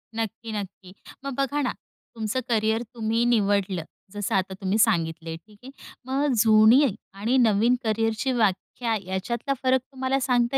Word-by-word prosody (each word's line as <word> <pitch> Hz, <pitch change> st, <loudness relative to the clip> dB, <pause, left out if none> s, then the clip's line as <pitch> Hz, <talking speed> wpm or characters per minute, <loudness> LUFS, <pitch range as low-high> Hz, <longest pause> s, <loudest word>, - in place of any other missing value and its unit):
नक्की, 225 Hz, 0 st, -4 dB
नक्की. 195 Hz, -2 st, -7 dB, 0.3 s
मग 275 Hz, -, -3 dB
बघा 280 Hz, +2 st, 0 dB
ना 255 Hz, -, 0 dB, 0.4 s
तुमचं 220 Hz, +3 st, -2 dB
करियर 220 Hz, 0 st, +1 dB
तुम्ही 225 Hz, 0 st, 0 dB
निवडलं. 200 Hz, -6 st, +1 dB, 0.3 s
जसं 205 Hz, -1 st, -2 dB
आता 190 Hz, 0 st, 0 dB
तुम्ही 195 Hz, +2 st, 0 dB
सांगितलं 165 Hz, -6 st, +1 dB
आहे, 165 Hz, -, -4 dB
ठीक 210 Hz, +5 st, -21 dB
आहे. 265 Hz, -, -10 dB, 0.4 s
मग 275 Hz, +1 st, +1 dB
जुनी 220 Hz, +4 st, +6 dB, 0.3 s
आणि 225 Hz, +7 st, 0 dB
नवीन 230 Hz, 0 st, +4 dB
करियरची 225 Hz, +3 st, 0 dB
व्याख्या 225 Hz, +1 st, 0 dB
याच्यातला 235 Hz, +8 st, -2 dB
फरक 260 Hz, 0 st, +3 dB
तुम्हाला 265 Hz, 0 st, -2 dB
सांगता 250 Hz, 0 st, +1 dB
225 Hz, 150 wpm, -25 LUFS, 200-250 Hz, 0.4 s, जुनी